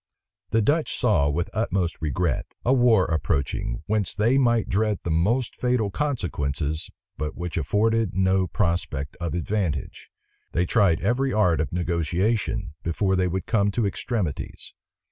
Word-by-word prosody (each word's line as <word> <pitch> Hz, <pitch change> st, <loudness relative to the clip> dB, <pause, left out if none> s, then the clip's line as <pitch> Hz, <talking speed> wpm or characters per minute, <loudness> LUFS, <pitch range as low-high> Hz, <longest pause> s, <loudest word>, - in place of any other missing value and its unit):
The 110 Hz, -1 st, +2 dB
Dutch 155 Hz, +7 st, +1 dB
saw, 105 Hz, -, +3 dB
with 85 Hz, +4 st, 0 dB
the -, -, -8 dB
utmost 95 Hz, -6 st, -1 dB
regret, 80 Hz, -2 st, -1 dB
a 125 Hz, -, +4 dB
war 120 Hz, -7 st, +5 dB
approaching, 70 Hz, -6 st, -1 dB
whence 105 Hz, -2 st, -1 dB
they 115 Hz, +6 st, +3 dB
might 120 Hz, -4 st, +2 dB
dread 105 Hz, +1 st, +1 dB
the 85 Hz, -, -2 dB
most 105 Hz, +11 st, +1 dB
fatal 125 Hz, -5 st, 0 dB
consequences, 80 Hz, -, -2 dB, 0.3 s
but 75 Hz, +1 st, -3 dB
which 90 Hz, 0 st, -4 dB
afforded 105 Hz, +5 st, +1 dB
no 95 Hz, 0 st, +2 dB
prospect 85 Hz, -7 st, -1 dB
of 85 Hz, -2 st, -3 dB
advantage. 85 Hz, -, -2 dB, 0.4 s
They 85 Hz, -, +2 dB
tried 95 Hz, -6 st, +3 dB
every 125 Hz, +7 st, +1 dB
art 90 Hz, -8 st, +3 dB
of 80 Hz, -, -3 dB
negotiation, 90 Hz, +2 st, -1 dB
before 95 Hz, +4 st, 0 dB
they 90 Hz, 0 st, +2 dB
would 95 Hz, +1 st, -2 dB
come 100 Hz, -3 st, +2 dB
to 110 Hz, +2 st, 0 dB
extremities. 100 Hz, -, -3 dB
95 Hz, 145 wpm, -25 LUFS, 85-110 Hz, 0.4 s, war